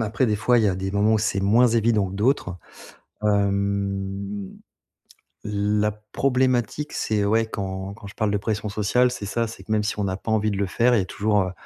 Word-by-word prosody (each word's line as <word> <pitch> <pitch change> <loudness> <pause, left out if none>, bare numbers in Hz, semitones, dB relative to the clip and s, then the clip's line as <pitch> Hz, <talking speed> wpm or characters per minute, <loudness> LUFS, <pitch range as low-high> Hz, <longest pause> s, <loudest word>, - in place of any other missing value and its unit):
Après, 115 +4 0
des 105 -3 +1
fois, 120 +3 +3
il 110 - +2
y - - +4
a 95 - 0
des 95 +1 -3
moments 105 +2 +2
où - - +3
c'est 105 -2 0
moins 110 +6 +4
évident 110 -3 +2
que 95 - -8
d'autres. 105 -3 0 0.7
Hem, 100 -1 -1 0.9
la 105 +1 0 0.2
problématique 130 +1 0
c'est 105 -2 -1
ouais, 110 +2 +2
quand 95 -2 -5
quand 100 -1 -11
je 100 - -11
parle 110 - 0
de 105 - +1
pression 105 +1 -2
sociale 105 +5 +2
c'est 120 -4 -6
ça, 115 +3 -1
c'est 110 - -10
que - - -9
même 105 -1 +2
si 105 - -2
on 105 - -1
n'a 95 -1 -2
pas 110 - -5
envie 110 -1 +1
de 100 - -3
le 100 - +1
faire, 120 +6 +2
il - - +3
y - - +2
a - - -3
toujours, 105 +3 +1
heu 90 - -4
105 Hz, 225 wpm, -23 LUFS, 100-110 Hz, 0.9 s, y